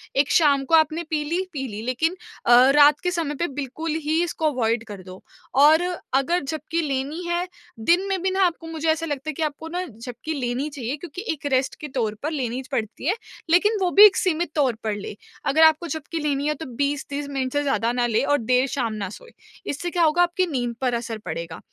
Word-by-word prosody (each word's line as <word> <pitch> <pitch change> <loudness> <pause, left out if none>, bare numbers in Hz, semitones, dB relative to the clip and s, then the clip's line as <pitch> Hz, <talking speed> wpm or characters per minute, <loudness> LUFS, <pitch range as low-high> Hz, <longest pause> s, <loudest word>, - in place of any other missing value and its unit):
एक 275 +1 +2
शाम 285 -4 +4
को 325 - +4
आपने 315 +1 +3
पी 305 -2 0
ली, 340 +5 -1
पी 270 -3 -3
ली 210 -2 -6
लेकिन 320 +8 0 0.3
अ, - - +3 0.2
रात 295 0 +6
के 360 - +1
समय 325 -4 -2
पे 340 +5 -1
बिल्कुल 305 +5 -4 0.2
ही 320 +2 +2
इसको 320 -3 -1
अवॉइड 230 -3 0
कर 200 -3 -9
दो। 185 0 -11 0.5
और 315 +2 +5 0.4
अगर 345 +4 0
झपक़ी 315 +3 -3
लेनी 285 +3 -3
है 345 +1 -1 0.4
दिन 360 +3 +3
में 380 -2 -1
भी 380 - +1
ना 380 +1 +2
आपको 330 -1 -2
मुझे 325 0 -4
ऐसा 320 +1 +1
लगता 290 -1 -4
है - - -2
कि 320 - -3
आपको 305 +1 -4
ना 355 +2 -2
झपक़ी 245 +3 -7
लेनी 260 +1 -2
चाहिए, 270 -2 -4
क्योंकि 345 +2 -8
एक 290 -2 -12
रेस्ट 260 0 +1
के 300 - -5
तौर 220 -4 0
पर 305 - -1
लेनी 255 -4 -2
च - - -16
पड़ती 230 -2 -3
है, 380 - +2 0.3
लेकिन 415 +6 +4
वो 365 - +2
भी 415 - +12
एक 410 - +6
सीमित 345 -3 0
तौर 270 -6 +2
पर 215 -2 -1
ले। 205 0 -7 0.4
अगर 315 +3 +5
आपको 315 +2 +5
झपक़ी 315 +2 -5
की 310 - -3
लेनी 285 0 0
है 300 - +2
तो, 320 +2 -8
20-30 280 +2 -3
मिनट 265 -2 -2
से 290 0 +1
ज़्यादा 255 -4 +1
ना 245 0 0
ले 225 -2 +1
और 290 +1 +2
देर 250 +1 +2
शाम 250 -5 -2
ना 205 -3 -4
सोए, 475 - -12 0.3
इससे 320 +5 -3
क्या 345 0 +2
होगा 320 +2 +3
आपकी 350 +1 +1
नींद 245 -6 -2
पर 255 -2 +1
असर 235 -1 -3
पड़ेगा। 165 -1 -5
290 Hz, 230 wpm, -23 LUFS, 255-330 Hz, 0.5 s, भी